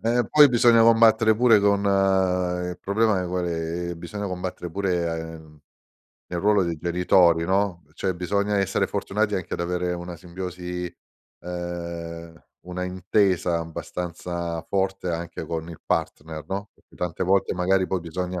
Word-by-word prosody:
eh, 120 +2 +2
poi 150 -1 +8
bisogna 120 -2 +5
combattere 115 -1 +5
pure 115 -1 +5
con 100 0 +3
il 90 -3 +1
problema, 105 0 +2
ehm, 90 - -3
qual 90 0 -1
è, 85 +1 -3
ehm, 85 - -6
bisogna 100 +4 -5
combattere 90 -1 -5
pure 90 -2 0
a 80 - -2
ehm, 80 -2 -9 0.7
nel 90 - -3
ruolo 100 +1 +3
dei 85 -1 -2
genitori, 85 -1 +3
no, 95 -1 0
cioè 95 +1 -1
bisogna 100 +4 0
essere 95 -1 +1
fortunati 105 +1 -1
anche 95 - -3
ad - - -5
avere 90 +1 -1
una 85 0 -6
simbiosi 90 0 -6 0.5
ehm, 85 -2 -6 0.3
una 90 0 -4
intesa 90 -1 +1
abbastanza 85 0 -5
forte 95 -1 -1
anche 85 0 -4
con 80 0 -4
il 80 - -11
partner, 80 0 -2
no, 100 +3 -4
perché - - -26
tante 90 0 -3
volte 95 +1 +2
magari 95 +1 +1
poi 95 - 0
bisogna 90 +2 -4
90 Hz, 155 wpm, -24 LUFS, 85-100 Hz, 0.7 s, poi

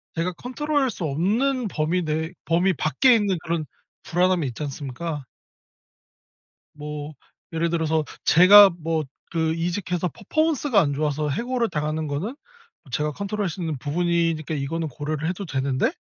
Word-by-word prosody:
제가 170 +2 -1
컨트롤할 275 - -1
수 195 - -6
없는 220 - +1
범위 165 +1 0
내에 160 +1 -2
범위 175 +3 +2
밖에 245 - +4
있는 200 -5 +1
그런 165 -2 -2 0.4
불안함이 180 -3 +1
있지 120 +3 -7
않습니까? 145 +1 -5 1.5
뭐 150 0 -6 0.4
예를 165 +1 0
들어서 160 -2 +1 0.2
제가 195 +4 +9
뭐 165 -2 -2 0.3
그 160 -1 +1
이직해서 175 +1 -2
퍼포먼스가 280 - +1
안 145 -4 +1
좋아서 150 +1 -1
해고를 240 - -1
당하는 155 -1 -2
거는 175 - -3 0.6
제가 150 +4 0
컨트롤할 200 +3 -3
수 180 - -7
있는 160 -3 -2
부분이니까 165 +2 0
이거는 160 +3 -2
고려를 150 +3 -3
해도 185 +3 -3
되는데 135 -4 0
165 Hz, 325 characters per minute, -24 LUFS, 150-195 Hz, 1.5 s, 제가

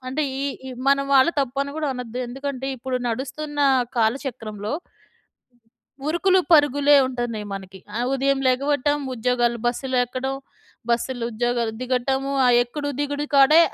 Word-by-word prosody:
అంటే, 275 +4 -1 0.2
ఈ - - -2 0.3
ఈ - - -6 0.2
మన 275 0 +4
వాళ్ళు 270 +3 +6
తప్పని 275 +1 -2
గూడా 315 - -1
అనద్దు. 250 -1 -6
ఎందుకంటే, 270 +1 -5
ఇప్పుడు 260 +1 -2
నడుస్తున్నా 280 +4 -2 0.3
కాలచక్రంలో... 220 -3 -2 1.3
ఉరుకులు 370 +4 +3
పరుగులే 290 -1 +5
ఉంటున్నాయి 240 -4 -4
మనకి. 190 -1 -8 0.2
ఆహ్, 245 - 0
ఉదయం 275 0 +1
లెగవటం, 290 +2 +1 0.2
ఉద్యోగాలు 240 0 +1
బస్సులెక్కడం. 255 +1 -1 0.6
బస్సులు, 240 +1 -1
ఉద్యోగాలు 235 0 0
దిగటము, 265 +2 -1
ఆ - - +5
ఎక్కడు 290 +4 -5
దిగుడు 290 0 -2
కాడే, 280 +4 +7
260 Hz, 120 wpm, -23 LUFS, 240-285 Hz, 1.3 s, కాడే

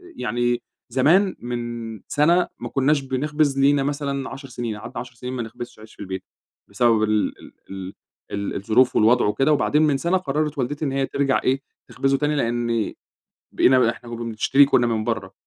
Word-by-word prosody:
يعني 120 - -1 0.3
زمان 165 - +3
من 120 -3 -5
سنة 170 +5 +3
ما 120 - -5
كناش 140 +3 +2
بنخبز 140 +1 0
لينا 140 0 +4
مثلًا 140 -1 -2
10 135 0 -9
سنين، 120 -3 -4
قعدنا 120 +4 -7
10 125 0 -8
سنين 125 +2 -6
ما 125 - -3
نخبزش 120 +1 -9
عيش 110 0 -14
في - - -34
البيت، 95 -1 -5 0.5
بسبب 115 -3 +3
ال 105 -1 0
ال - - -14 0.2
ال 95 0 -7 0.4
ال 100 0 -3
الظروف 110 +6 +2
والوضع 120 +3 +4
وكده، 135 +9 +2
وبعدين 150 +1 +2
من 150 -3 +3
سنة 170 +6 +1
قرّرت 150 -2 -2
والدتي 145 +4 -2
إن 140 - -1
هي 135 0 0
ترجع 135 0 0
إيه 135 +1 +1 0.3
تخبزه 135 0 0
تاني، 150 +1 0
لأني 115 -3 -1 0.5
بقينا 130 -2 +4
إحنا 120 - -12
كنّا 120 0 -5
بنشتري 115 +5 +4
كنّا 120 -3 +3
من 110 -2 0
برّه، 110 -5 -3
125 Hz, 180 wpm, -23 LUFS, 115-140 Hz, 0.5 s, لينا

